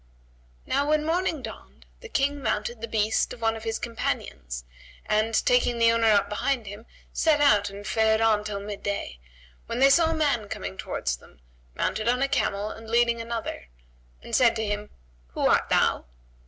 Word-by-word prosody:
"[FN#131] - - -32
Now 285 +1 +2
when 305 0 +2
morning 330 -2 0
dawned - - -10
the 465 - -11
King 285 -4 0
mounted 220 -1 -2
the 230 - -4
beast 220 0 0
of 235 - -12
one 225 0 +1
of 220 - -8
his 225 0 -1
companions - - -4 0.4
and, 215 +1 +1
taking 245 -1 +3
the 230 0 +5
owner 230 0 +2
up 205 -2 +4
behind 230 +3 -1
him, 205 +3 -9 0.3
set 315 -2 +3
out 210 -9 +4
and 200 +1 -10
fared 220 0 +2
on 220 -2 +3
till 210 -1 -4
midday, 200 - -4 0.5
when - - -3
they 270 +2 +6
saw 325 +2 +5
a 325 - 0
man 280 -9 0
coming 95 0 -5
towards 60 -8 -3
them, - - -20 0.4
mounted 215 +1 -1
on 250 +2 +2
a - - +2
camel 205 -5 -1
and 225 0 -10
leading 235 0 +2
another, 230 - -5 0.6
and - - -3
said 235 -3 +5
to 220 -1 -1
him, 205 0 -3 0.4
"Who - - -4
art - - +3
thou?" - - +2
225 Hz, 185 wpm, -26 LUFS, 205-245 Hz, 0.6 s, they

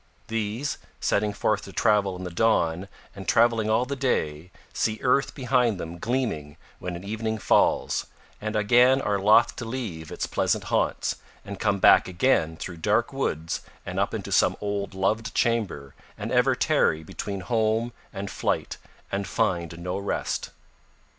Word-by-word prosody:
These, 115 +5 -2 0.2
setting 105 +1 +1
forth 105 +1 0
to 100 - -9
travel 105 -3 +2
in 90 - -7
the 90 - -5
dawn 90 -3 +1 0.3
and - - -9
travelling 115 -2 +3
all 110 +3 +3
the 140 +2 -3
day, 85 - -1 0.2
see 110 0 0
earth 135 +2 +2
behind 125 -6 +1
them 85 +1 -6
gleaming 110 - -2 0.2
when 90 0 -5
evening 110 +2 -2
falls, - - +2 0.3
and 110 +1 -3
again 120 +5 +5
are 105 -6 0
loth 105 +4 +5
to 115 - -5
leave 110 -10 -5
its - - -2
pleasant - - 0
haunts, - - 0 0.3
and 100 -1 -7
come 100 - +1
back - - +6
again 85 -4 +1
through 90 +1 -6
dark 105 +9 +1
woods 80 - -2 0.2
and - - -3
up - - +1
into - - -5
some - - +3
old 100 -1 -3
loved 105 +3 -1
chamber, 100 - 0 0.2
and - - -5
ever - - +3
tarry 80 0 +2
between 100 +4 -5
home 110 +4 0 0.2
and 100 -1 -5
flight - - -1 0.3
and 100 -1 -2
find 85 -3 -1
no 90 +3 -3
rest. 100 - -2
105 Hz, 155 wpm, -26 LUFS, 90-115 Hz, 0.3 s, back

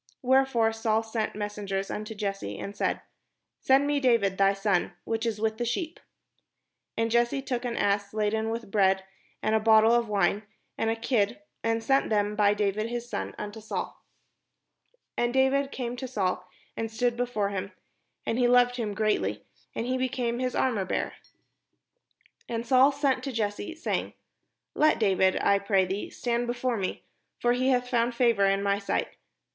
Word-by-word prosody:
Wherefore 255 -3 +3
Saul 225 0 0
sent 225 -2 -3
messengers 205 -2 -3
imto 215 +1 -5
Jesse, 195 - -3
and 200 - -6
said: - - -1 0.6
"Send 270 +2 +4
me 290 0 +1
David 230 -7 +2
thy 195 0 +5
son, 195 -3 0
which 225 +1 -2
is 215 -2 -2
with 220 +1 -1
the - - 0
sheep." 275 +8 -3 1.0
And 225 0 0
Jesse 240 +3 +2
took 250 -2 -3
an 235 -1 -2
ass 200 0 +1
laden 220 +1 0
with 225 -2 -5
bread, 190 -2 +3 0.4
and 215 - +1
a 220 - +4
bottle 220 0 +5
of 235 -2 +2
wine, 200 0 +2 0.3
and 225 - 0
a 225 - +1
kid, 225 0 0 0.2
and 225 0 0
sent 270 +4 +2
them 210 -1 +1
by 205 -1 +3
David 210 +1 0
his 240 0 -4
son 95 - -4
unto 210 +2 -6
Saul. 215 - -5 1.1
And 240 0 +1
David 270 +1 +2
came 245 -2 -4
to 260 - -5
Saul, 185 -6 -2 0.3
and 225 0 -3
stood 240 +2 0
before 240 -4 -1
him: 195 0 -4 0.5
and 225 - -1
he 245 - +4
loved 245 0 +4
him 215 -4 -3
greatly; 215 0 0 0.3
and 230 - -2
he 255 +1 -1
became 245 -2 -1
his 255 -1 -1
armourbearer. 215 -8 0 1.4
And 230 0 -3
Saul 260 +3 +5
sent 280 -1 0
to 275 - -3
Jesse, 215 +5 -3
saying, 325 - -2 0.6
"Let 310 +1 +3
David, 190 -3 +3
I 200 0 +3
pray 200 -1 +2
thee, 190 +3 -4
stand 240 0 -2
before 245 0 -1
me; 190 -2 -3 0.4
for 240 0 +2
he 255 +2 +1
hath 250 -1 +2
found 240 -1 +1
favour 235 -5 +3
in 195 0 +1
my 200 0 +1
sight." 200 - -2
225 Hz, 170 wpm, -27 LUFS, 205-245 Hz, 1.4 s, thy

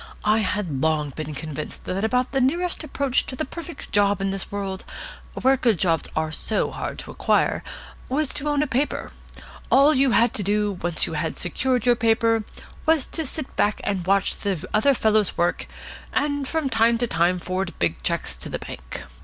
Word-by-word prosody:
I 215 +1 +4
had 185 -9 -1
long 155 -2 +1
been 155 +2 -6
convinced 155 0 -6
that 190 +2 -2
about 250 +3 +1
the 270 - +1
nearest 340 +7 +1
approach 280 -3 0
to 255 - -4
the - - -2
perfect 335 +4 -8
job 205 -1 +3
in 195 0 0
this 195 0 -4
world, 195 -2 -4 0.6
where 265 +1 +4
good 235 -6 +2
jobs 165 -2 +1
are 155 0 0
so 215 +6 0
hard - - -5
to - - -7
acquire, - - +1 0.5
was 285 +2 +1
to 295 +1 -1
own 290 0 +2
a - - 0
paper. 275 +1 -1 0.6
All 280 +3 +6
you 270 0 +4
had 235 -1 +4
to - - -1
do, 205 +1 +1
once 175 -2 0
you - - -5
had 155 +1 -2
secured 250 +7 0
your 245 -1 +5
paper, 225 -1 +2 0.4
was 315 -4 +4
to 320 - 0
sit 290 0 -4
back 210 +1 +2
and 190 -3 -2
watch 195 0 +2
the 185 -4 -2
other 270 +6 +4
fellows 215 -3 +2
work, 175 0 0 0.5
and 285 -2 0
from 320 -1 -1
time 230 -1 +3
to 240 - +1
time 180 -3 +2
forward 185 +1 -3
big 85 -5 0
cheques - - -1
to - - -7
the - - -2
bank. 60 0 -7
215 Hz, 195 wpm, -24 LUFS, 180-265 Hz, 0.6 s, All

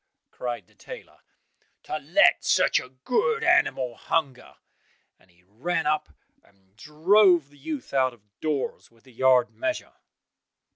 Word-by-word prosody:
cried 120 -1 -5
the - - -28
tailor, - - -12 0.6
"to - - -4
let - - +3
such - - +3
a 125 - -10
good 260 - -1
animal 350 - +2
hunger," 140 -1 -3 0.6
and 90 - -27
he 90 0 -29
ran 115 - -3
up 155 0 0 0.3
and 95 -1 -31
drove 165 - +3
the 145 - -20
youth 305 - -6
out 130 -1 +2
of 120 -4 -21 0.2
doors 150 -4 -3
with 115 -1 -28
the 130 - -19
yard 130 +1 +3
measure. 325 -1 -4
135 Hz, 140 wpm, -25 LUFS, 120-175 Hz, 0.6 s, let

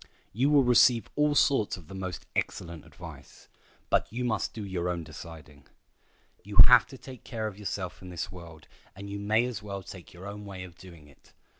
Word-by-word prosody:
You 130 +7 +2
will 145 -2 +6
receive 120 -1 +5
all 150 0 +3
sorts 135 -10 +3
of 85 -4 -14
the - - -10
most 95 -2 -5
excellent 85 -2 -3
advice, - - -12 0.4
but - - +2
you 125 +2 -2
must 110 -4 0
do 110 -2 -6
your 90 -2 -2
own 85 -1 -2
deciding. 75 -4 -11 0.8
You 100 0 -8
have 125 -1 +7
to 135 - -11
take 130 -2 -11
care 110 -2 -4
of 105 -2 -5
yourself 95 -4 -4
in 90 - -9
this 85 -2 -5
world, 85 -4 -12 0.3
and 100 +1 -8
you 100 - -4
may 110 +3 +2
as 120 -4 -4
well 100 -2 -6
take 90 -2 -11
your 90 +2 -11
own 100 +1 -7
way 95 -2 -7
of 90 -2 -10
doing 85 -5 -14
it. 70 - -22
100 Hz, 200 wpm, -29 LUFS, 90-115 Hz, 0.8 s, have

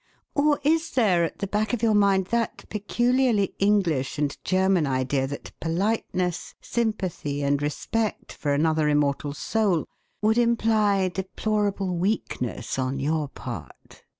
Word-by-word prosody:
Or 290 0 +3
is 320 +2 +2
there 200 -9 +3
at 165 - -3
the 200 - -2
back 210 +3 -1
of 235 -2 -1
your 225 -2 +4
mind 200 -2 +3
that 235 -1 -1
peculiarly 240 0 +1
English 180 -10 +1
and 145 -1 0
German 185 -3 +2
idea 130 0 0
that 140 - -7
politeness, 180 0 -1
sympathy, 185 -11 -2
and 140 0 +1
respect 210 +9 -2
for 145 - -2
another 155 +1 +2
immortal 145 -1 +1
soul 200 -3 +1 0.3
would 220 +2 +2
imply 215 -5 +2
deplorable 195 0 -1
weakness 170 - -2
on 130 +1 -1
your 150 +2 0
part? - - -9
190 Hz, 130 wpm, -25 LUFS, 150-215 Hz, 0.3 s, your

